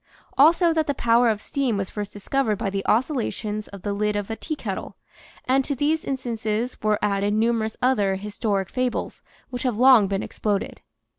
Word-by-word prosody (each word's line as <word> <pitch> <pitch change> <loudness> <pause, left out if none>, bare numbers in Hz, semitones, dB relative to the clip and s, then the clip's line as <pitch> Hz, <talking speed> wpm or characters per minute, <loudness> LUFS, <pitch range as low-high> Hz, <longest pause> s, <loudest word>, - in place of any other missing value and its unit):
Also 330 +4 +5
that 315 -1 0
the 285 - 0
power 235 0 +3
of 215 -2 0
steam 260 -6 -1
was 195 -1 -3
first 205 -1 -5
discovered 215 +2 -1
by 195 - -2
the 195 0 -2
oscillations 220 -4 -1
of 200 -2 -11
the 205 - -1
lid 210 +1 0
of 205 +1 -3
a - - -2
teakettle; 225 - -5 0.5
and 265 +1 +3
to 280 - -2
these 305 +4 0
instances 235 -3 -2
were 215 -1 +2
added 205 0 +1
numerous 220 0 0
other 210 -7 +2
historic 200 -1 -2
fables 255 -1 -2 0.3
which 245 -1 -4
have 250 -5 -1
long 250 -4 +7
been 195 0 -2
exploded. 205 -2 -3
220 Hz, 175 wpm, -24 LUFS, 205-260 Hz, 0.5 s, long